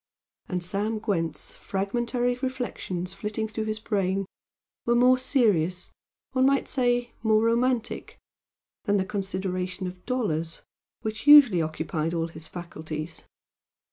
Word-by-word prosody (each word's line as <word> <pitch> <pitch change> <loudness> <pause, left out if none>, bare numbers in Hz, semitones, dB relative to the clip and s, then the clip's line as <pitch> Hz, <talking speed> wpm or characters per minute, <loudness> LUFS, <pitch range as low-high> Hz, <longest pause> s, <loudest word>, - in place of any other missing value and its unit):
And 180 -1 -2
Sam 205 +5 -1
Gwent's 165 -8 -2
fragmentary 240 +5 -1
reflections 245 -8 -4
flitting 210 +2 -3
through 220 0 -4
his 215 0 -2
brain 195 -3 0 0.6
were 235 - +2
more 250 +1 +5
serious 195 - +1 0.4
one 260 0 +3
might 275 0 +2
say 245 -2 +1
more 220 -1 +3
romantic, 235 +1 0 0.7
than 205 0 +3
the 190 - 0
consideration 190 -1 -3
of 180 0 -7
dollars, 165 -11 -1 0.4
which 220 +4 -4
usually 275 - +9
occupied 160 +1 -2
all 165 0 -1
his 160 0 -10
faculties. 160 -2 -7
205 Hz, 120 wpm, -26 LUFS, 180-240 Hz, 0.7 s, usually